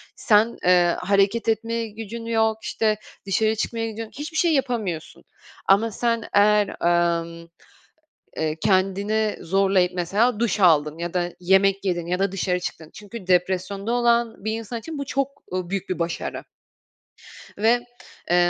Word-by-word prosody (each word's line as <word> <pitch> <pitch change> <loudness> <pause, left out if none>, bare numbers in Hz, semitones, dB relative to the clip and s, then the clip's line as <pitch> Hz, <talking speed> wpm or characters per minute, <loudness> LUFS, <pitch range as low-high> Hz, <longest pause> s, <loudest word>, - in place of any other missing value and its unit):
sen, 220 +1 +3
eee, 175 -1 +4
hareket 200 +4 +1
etmeye 230 +1 -1
gücün 225 +2 -7
yok, 220 -1 +1
işte, 215 -1 0 0.3
dışarı 215 +3 +1
çıkmaya 225 +1 -2
gidiyorsun, 220 0 -7
hiçbir 315 +2 -5
şey 335 -1 +3
yapamıyorsun 230 - -2 0.4
ama 215 +4 +4
sen 230 +1 -1
eğer, 210 0 +4 0.5
emm, 170 0 -10 0.9
eee, 155 -1 -1
kendini 200 +3 +1
zorlayıp 190 0 +2
mesela 205 +6 +1
duş 230 -2 0
aldın 155 -4 +4
ya 170 0 -4
da 175 -1 -1
yemek 195 +2 +3
yedin 175 -3 -1
ya 180 +1 -1
da 195 -1 +1
dışarı 185 -1 -1
çıktın. 160 -3 -6
Çünkü 210 -1 -10
depresyonda 185 +3 0
olan 235 -3 +1
bir 220 - 0
insan 225 +1 -4
için 315 +6 -7
bu 280 - -4
çok, 275 0 -3
ııı, 185 -1 -3
büyük 195 0 -3
bir 185 - -2
başarı 170 0 -3 1.1
ve, 230 +4 +2 0.5
eee, - - +5
205 Hz, 145 wpm, -23 LUFS, 180-230 Hz, 1.1 s, eee